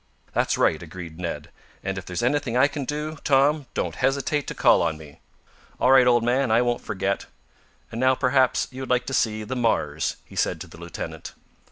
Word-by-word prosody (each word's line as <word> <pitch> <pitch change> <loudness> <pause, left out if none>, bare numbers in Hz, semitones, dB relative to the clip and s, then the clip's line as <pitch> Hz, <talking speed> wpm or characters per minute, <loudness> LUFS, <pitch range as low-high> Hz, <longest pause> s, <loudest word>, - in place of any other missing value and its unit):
"That's - - +1
right!" - - +2
agreed 85 -3 -9
Ned. 85 -2 -5 0.3
"And, 95 - -2
if 95 - -7
there's 90 +5 -3
anything 125 -1 +1
I 135 +3 +6
can 145 -2 -5
do, 150 +2 -4
Tom, 140 +1 +3
don't - - -2
hesitate 140 +2 0
to - - -5
call - - +5
on 80 -2 0
me." 75 -2 -14 0.6
"All 130 - +4
right, 130 -2 +7
old 120 -1 +4
man. 125 +2 +1
I 115 +2 +4
won't 120 0 0
forget. 100 -2 -2 0.6
And 115 - -4
now, 130 0 +4
perhaps, 130 0 +2
you 130 +1 -8
would 130 - -6
like 125 0 +2
to 135 - -5
see 110 -3 +1
the 125 +5 -4
Mars," 80 - 0
he - - -15
said - - 0
to - - -7
the - - -14
lieutenant. 85 -1 -7
125 Hz, 205 wpm, -24 LUFS, 95-135 Hz, 0.6 s, right